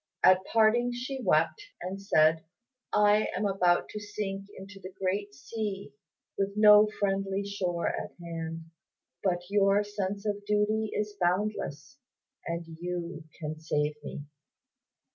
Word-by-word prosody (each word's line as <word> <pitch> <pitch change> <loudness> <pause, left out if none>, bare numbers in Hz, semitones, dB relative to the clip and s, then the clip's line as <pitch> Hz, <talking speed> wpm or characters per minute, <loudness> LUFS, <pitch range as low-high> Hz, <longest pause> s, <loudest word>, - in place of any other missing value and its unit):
At 185 0 +6
parting 230 +2 +4
she 255 +2 -4
wept, 415 - +2 0.2
and 185 +2 -5
said, 160 -4 +4 0.5
"I 210 +1 +4
am 210 - 0
about 180 -3 +2
to 210 - -5
sink 205 -1 -5
into 195 +1 -10
the 185 -1 -8
great 190 -4 -1
sea, 205 +4 -5 0.5
with 200 +1 -1
no 210 0 +8
friendly 195 0 0
shore 180 -4 -2
at - - -4
hand. 165 -1 -5 0.6
But 175 -2 0
your 200 0 +4
sense 205 0 -4
of 205 -1 -2
duty 210 +1 +1
is 210 0 -2
boundless, 180 - -1 0.5
and 170 0 -3 0.2
you 175 -2 -4
can 155 -1 -5
save 150 -1 0
me. 145 - -6
195 Hz, 130 wpm, -29 LUFS, 175-210 Hz, 0.6 s, no